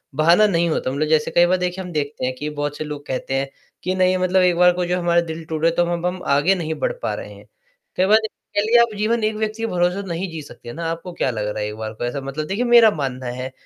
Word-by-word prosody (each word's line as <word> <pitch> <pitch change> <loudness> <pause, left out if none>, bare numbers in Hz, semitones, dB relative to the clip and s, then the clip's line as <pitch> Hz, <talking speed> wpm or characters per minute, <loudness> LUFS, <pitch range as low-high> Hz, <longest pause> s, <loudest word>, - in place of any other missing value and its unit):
बहाना 170 +7 +5
नहीं 170 -3 +1
होता, 140 -4 -1
मतलब 145 +3 -1
जैसे 155 0 +2
कई 175 - +5
बार 185 +1 +2
देखिए 180 +1 -3
हम 180 - -8
देखते 145 -4 -2
हैं 130 - -1
कि 150 +4 -4
बहुत 145 -1 -4
से - - -3
लोग 150 -1 -7
कहते 130 0 -3
हैं 135 +1 -1 0.3
कि 185 +1 -1
नहीं, 185 0 +3
मतलब 185 +1 +2
एक 180 -1 +3
बार 180 0 +6
को 180 0 -1
जो 180 +1 0
हमारा 170 -1 +3
दिल 160 -1 -6
टूटा, 160 +1 +1
तो 170 +1 +1
अब 170 0 -3
हम 180 0 -2
आगे 145 +7 +3
नहीं 160 -3 -3
बढ़ - - 0
पा - - -1
रहे - - -8
हैं, - - -16 0.5
कई 185 - +3
बार 210 +3 +6 0.4
कह 205 - +3
लीजिए 235 +3 +5
आप 235 -2 +1
जीवन 220 +2 0
एक 215 0 +1
व्यक्ति 215 +1 -3
के - - +1
भरोसे 180 0 0
तो 200 - -9
नहीं 175 +2 -3
जी 160 - -6
सकते 120 -4 -11
ना, 165 +1 -5
आपको 170 +2 -6
क्या 135 - 0
लग 105 -2 -3
रहा 105 +1 -3
है, - - -2
एक 105 - -7
बार 110 0 -5
को 110 - -7
ऐसा 135 +3 -3
मतलब 135 +3 -4
देखिए 200 +8 -1
मेरा 235 -2 +7
मानना 130 -3 -3
है 130 +1 -4
170 Hz, 285 wpm, -21 LUFS, 145-185 Hz, 0.5 s, मेरा